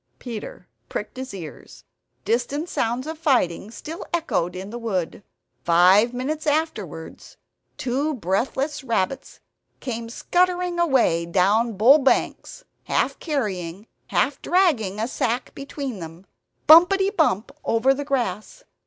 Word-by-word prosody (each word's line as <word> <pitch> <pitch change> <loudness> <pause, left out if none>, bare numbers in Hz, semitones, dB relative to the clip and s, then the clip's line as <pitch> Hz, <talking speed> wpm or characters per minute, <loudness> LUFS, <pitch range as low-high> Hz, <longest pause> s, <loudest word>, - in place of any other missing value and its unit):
Peter 225 -6 -8 0.2
pricked 210 - -5
his 260 0 -6
ears; 170 -6 -10 0.4
distant 250 - -1
sounds 240 -4 -1
of 315 0 -6
fighting 240 - +1
still 310 +8 -8
echoed 185 - -1
in 190 +3 -7
the 240 - -6
wood. 195 -6 -3 0.4
Five 185 +7 +5
minutes 295 +5 -4
afterwards 255 - -3 0.4
two 275 +4 -1
breathless 255 - -2
rabbits 230 +1 -2 0.4
came 230 -2 -5
scuttering 360 +5 0
away 250 - +2
down 205 +6 +2
Bull 260 +9 +7
Banks, 280 - 0 0.2
half - - 0
carrying, 200 - -3 0.2
half - - 0
dragging 265 - +1
a 225 - -1
sack 245 -1 -2
between 275 -5 -6
them, 165 +2 -10 0.4
bumpetty 385 +5 +7
bump 270 - +1
over 235 +4 +3
the 285 +1 -4
grass. 260 - -3
245 Hz, 120 wpm, -23 LUFS, 195-300 Hz, 0.4 s, Bull